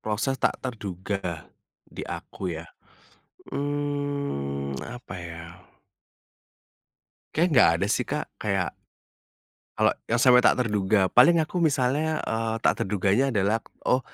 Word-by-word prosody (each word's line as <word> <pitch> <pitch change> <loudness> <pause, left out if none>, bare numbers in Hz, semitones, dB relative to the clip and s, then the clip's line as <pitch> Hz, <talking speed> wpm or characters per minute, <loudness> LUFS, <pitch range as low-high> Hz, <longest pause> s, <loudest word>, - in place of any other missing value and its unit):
proses 110 +5 -2
tak - - +2
terduga 95 - -4 0.4
di - - -10
aku 90 -4 -5
ya? 85 - -7 0.8
Mmm, 140 - -2
apa 120 -4 -8
ya? 85 +1 -9 1.7
Kayaknya 175 +3 +2
enggak 125 -10 +7
ada 100 - 0
sih 115 +4 +1
Kak. 150 +1 -2 0.2
Kayak 100 -4 0 1.1
kalau 110 0 +3 0.2
yang 115 - +2
sampai 125 -1 +7
tak - - +5
terduga, 100 -2 +1
paling 135 +8 +7
aku 175 +3 -3
misalnya, 150 +1 +1
eee, 115 0 -1
tak - - +3
terduganya 100 +6 +2
adalah, 105 -1 +1 0.2
"Oh 125 - +3
110 Hz, 120 wpm, -26 LUFS, 95-135 Hz, 1.7 s, enggak